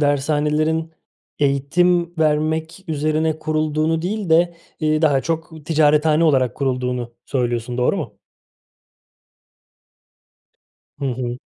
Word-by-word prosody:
dershanelerin, 150 +3 +1 0.5
eğitim 170 +5 +1
vermek 160 +3 0
üzerine 155 +1 0
kurulduğunu 155 +1 0
değil 200 0 -3
de, 170 +1 +4 0.3
iii, 155 0 +1
daha 140 -4 +4
çok, 160 -1 -4
ticarethane 155 0 +3
olarak 130 -5 +2
kurulduğunu 125 -3 -2
söylüyorsun, 120 -2 -2
doğru 125 - +2
mu? - - -6 2.8
Hı 140 - -4
hı. 125 -1 -3
155 Hz, 95 wpm, -20 LUFS, 140-160 Hz, 2.8 s, de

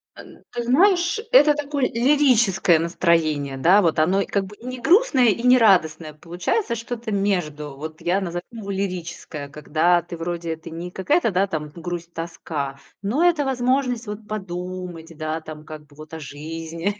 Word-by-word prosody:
Э, - - -11 0.3
ты 240 -1 -3
знаешь, 350 - +3
это 300 -12 +7
такое 290 -2 -1
лирическое 235 - +3
настроение, 160 -5 +1
да. 185 +9 +5
Вот 165 -3 +1
оно 185 +5 +3
и - - -1
как 200 -1 -1
бы 205 +2 -12
и 240 - -15
не 255 0 -5
грустное, 315 - +4
и 230 +4 -1
не 250 0 +6
радостное. 160 -8 +3
Получается 175 - -2
что-то 230 -1 -5
между. 155 -8 -1
Вот 155 +1 -8
я 180 +3 +1
назову 175 -1 -4
его 210 -4 -6
лирическое, 175 -6 -4
когда 160 +4 +1
ты 170 0 -9
вроде 170 -1 -3
ты 165 - -11
не 170 +2 -7
какая-то 225 - +1 0.2
там 155 -4 -4
грусть-тоска, 165 -5 -5 0.2
но 235 +12 0
это 310 -5 +2
возможность, 250 -2 0
вот, 210 +1 -7
подумать, 180 -4 -6
да, 155 0 -3
там, 155 -1 -9
как 155 -1 -9
бы 145 - -21
вот 155 +1 -12
о 160 - -5
жизни 165 +6 -5
180 Hz, 165 wpm, -22 LUFS, 160-235 Hz, 0.3 s, это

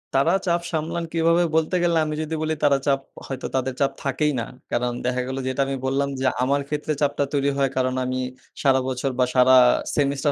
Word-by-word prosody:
তারা 150 +6 +3
চাপ 170 0 +2
সামলান 165 +1 -2
কীভাবে? 165 +1 +3
বলতে 160 +3 +1
গেলে 170 -1 +2
আমি 155 0 -3
যদি 160 +1 -3
বলি, 155 0 0
তারা 140 -1 +5
চাপ 135 -1 +3 0.3
হয়তো 135 - -4
তাদের 130 0 0
চাপ 135 0 +3
থাকেই 150 +2 +1
না। 115 - -2 0.3
কারণ 120 0 0
দেখা 125 0 0
গেলো, 130 +1 -3
যেটা 130 +1 -1
আমি 135 - -2
বল্লাম 140 +1 0
যে, 130 - -1 0.2
আমার 140 +2 +1
ক্ষেত্রে 150 +1 -2
চাপটা 145 0 +1
তৈরি 140 0 +2
হয়, 135 -1 +2
কারণ 130 0 +1
আমি 130 0 -2 0.4
সারা 135 -1 +4
বছর 130 +1 -2
বা, 125 - +5
সারা 130 +1 +6 0.4
সেমিস্টার 140 0 +1
140 Hz, 205 wpm, -23 LUFS, 130-155 Hz, 0.4 s, সারা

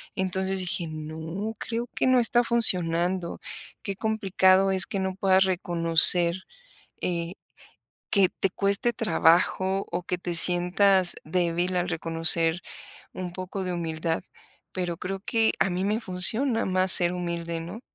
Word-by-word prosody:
Entonces 190 0 -2
dije: 175 -1 -4
"No, 160 +7 -8
creo 235 +1 -6
que - - -1
no 255 -1 +2
está 240 +1 +3
funcionando". 180 -6 +1 0.4
Qué 195 - -6
complicado 195 -3 0
es 190 -2 +4
que 195 - -5
no 190 -1 -4
puedas 190 -1 +1
reconocer, 170 -1 +4 0.7
eh, 170 0 -4 0.8
que 195 -3 +2
te 195 - -4
cueste 200 +5 0
trabajo 190 0 -1
o - - -5
que 180 - -5
te 175 -1 -5
sientas 180 +2 +3
débil 175 +2 -3
al 180 0 -3
reconocer 165 0 0 0.5
un 180 -1 -8
poco 185 +2 -8
de 180 - -5
humildad, 165 -1 -5 0.5
pero 175 -2 -5
creo 190 +1 -7
que 225 +2 -1
a - - +1
mí 180 +2 -4
me 210 +3 -2
funciona 225 +5 +2
más 185 0 0
ser 175 -1 +9
humilde, 170 -1 -6
¿no? 175 +7 -10
185 Hz, 140 wpm, -24 LUFS, 170-195 Hz, 0.8 s, ser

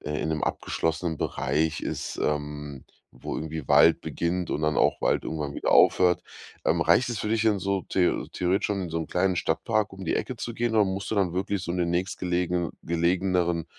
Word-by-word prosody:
äh, 75 0 -3
in - - -2
'nem 80 -1 -1
abgeschlossenen 80 0 -2
Bereich 75 +3 -1
ist, - - -4
ähm, 75 -2 -3 0.3
wo - - -5
irgendwie 80 -2 -5
Wald - - +5
beginnt 85 +1 -2
und - - -1
dann 75 -1 +1
auch - - +2
Wald - - +1
irgendwann 75 -3 -4
wieder - - -1
aufhört. 90 -1 +5 0.4
Ähm, - - +3
reicht 125 +2 +3
es 120 -3 -3
für 105 - -3
dich 115 0 +2
denn 110 -3 +3
so 100 +1 0
theo 90 -2 +1
theoretisch 90 +2 0
schon 100 -2 -2
in 90 - -5
so 80 - -1
'm 80 - -4
kleinen 95 +1 +1
Stadtpark 110 +4 0
um 95 0 -8
die 80 - 0
Ecke 130 - -3
zu 120 - -5
gehen 120 0 -1
oder 110 -1 +5
musst 95 +1 -3
du - - 0
dann 95 -4 +1
wirklich 95 +1 -2
so 85 - -3
in 90 - -2
den 85 -1 +1
nächstgelegenen 90 -1 -1
gelegeneren, 85 0 +1
90 Hz, 210 wpm, -26 LUFS, 80-95 Hz, 0.4 s, Wald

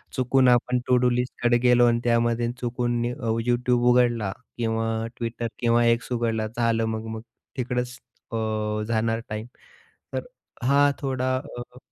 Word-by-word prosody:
चुकून 130 0 +3
आपण 125 +1 +3
टू-डू 125 0 +4
लिस्टकडे 120 0 +1
गेलो 120 0 +6
आणि 120 0 +2
त्यामध्ये 120 0 +2
चुकून 120 0 -1
अ, 125 -4 -4 0.2
YouTube 120 0 +2
उघडला 120 -5 +2 0.3
किंवा 115 -1 -1 0.3
Twitter 115 0 -2
किंवा 120 0 +3
X 115 - -11
उघडला, 115 -2 -1
झालं 115 -1 +2
मग-मग 110 0 -4 0.4
तिकडंच 125 0 -2 0.3
अ, - - -3 0.5
जाणार 115 0 0
टाईम. 110 +2 -5 0.7
तर - - -3 0.4
हां, 140 +2 +4
थोडा 130 -1 0 0.2
अ 120 +1 -9
120 Hz, 130 wpm, -25 LUFS, 115-125 Hz, 0.7 s, गेलो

